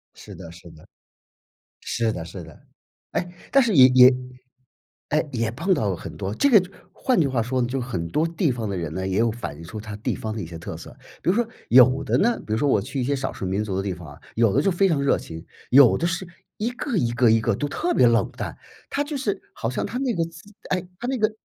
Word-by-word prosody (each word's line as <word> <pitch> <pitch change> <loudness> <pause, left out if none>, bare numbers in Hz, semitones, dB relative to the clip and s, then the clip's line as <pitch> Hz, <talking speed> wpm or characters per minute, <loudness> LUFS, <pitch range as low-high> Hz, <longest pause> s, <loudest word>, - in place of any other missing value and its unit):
是 - - -12
的 85 - -10
是 85 0 -13
的， 80 - -17 0.9
是 115 -1 -1
的 85 - -5
是 90 0 -8
的。 80 -2 -14 0.5
诶， 175 0 -3 0.2
但 275 - +6
是 230 -4 +1
也 130 -2 +9
也 125 0 +7 0.9
诶， 155 +1 +1
也 115 -3 -1
碰 170 - 0
到 110 - 0
了 95 - -1
很 75 - -9
多 95 +3 -4
这 280 - +3
个 215 -7 +7 0.3
换 255 -8 +1
句 150 - +3
话 130 -4 0
说 130 +3 -1
就 125 +2 -2
很 90 -9 -3
多 155 - +1
地 165 -2 0
方 115 -4 -4
的 95 - -3
人 80 -3 -4
呢， 95 0 -3
也 95 +1 -1
有 115 0 +3
反 105 -10 -6
映 80 - -11
出 105 +5 -7
它 105 -1 -7
地 105 - -2
方 110 -1 -5
的 105 - -4
一 - - -5
些 85 0 -8
特 - - -7
色。 - - -12 0.3
比 - - +1
如 - - 0
说 240 -1 +1 0.2
有 130 +3 +6
的 - - +1
呢 235 +3 +2
比 110 - -3
如 - - +1
说 145 +3 +1
我 105 - +4
去 135 +4 -4
一 - - 0
些 140 +3 0
少 135 0 -3
数 95 - -6
民 95 +3 -1
族 100 -3 -3
的 95 - 0
地 100 - -2
方 85 -3 -11
啊， 70 - -13 0.2
有 115 -1 +3
的 140 - +4
就 195 - +2
非 195 +3 +3
常 155 -6 +1
热 140 - +3
情， 80 +1 -9 0.3
有 130 -2 +7
的 170 - -1
是 180 +2 -3 0.3
一 225 +3 -1
个 245 0 -4
一 120 -6 +1
个 120 -1 +4
一 115 0 +3
个 115 -3 +1
都 145 - -2
特 350 - -2
别 125 - +5
冷 115 0 +2
淡。 - - -5 0.4
他 285 - 0
就 290 -1 -4
是 205 -7 -2
好 115 - -3
像 - - -2
他 245 - -4
那 260 -2 0
个 165 -4 0
自 165 +5 -14 0.2
哎， 185 -1 -1
他 245 - -4
那 265 -1 -1
个 215 0 +2
125 Hz, 285 characters per minute, -23 LUFS, 105-175 Hz, 0.9 s, 也